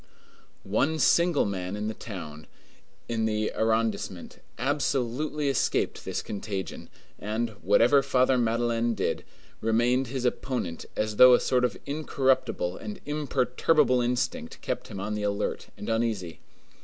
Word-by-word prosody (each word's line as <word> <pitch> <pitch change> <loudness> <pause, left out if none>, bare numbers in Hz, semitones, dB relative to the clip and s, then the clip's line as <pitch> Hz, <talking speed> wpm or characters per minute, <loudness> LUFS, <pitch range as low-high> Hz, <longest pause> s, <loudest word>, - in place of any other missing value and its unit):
One 140 +11 +1
single 170 0 +4
man 95 -1 -3
in 105 +1 -3
the 110 - -2
town, 80 -9 -8 0.6
in 110 -1 0
the 110 0 0
arrondissement, 110 -5 -1 0.2
absolutely 140 +2 -1
escaped 135 - 0
this - - -3
contagion, 100 -2 -5 0.3
and, 110 +3 -2
whatever 115 +8 +5
Father 130 -1 +3
Madeleine 115 -1 +1
did, 100 - -1 0.4
remained 120 +4 +2
his 130 0 -3
opponent 125 -8 -2
as 105 -1 -2
though 125 -1 +9
a - - +2
sort 125 -1 +1
of 125 - 0
incorruptible 135 - 0
and 210 -2 -7
imperturbable 140 -2 +2
instinct 180 - -2
kept 125 - -3
him 100 -4 -7
on 100 +2 -3
the 105 - -2
alert 100 0 -2
and - - -7
uneasy. 110 -9 -1
120 Hz, 130 wpm, -27 LUFS, 105-135 Hz, 0.6 s, though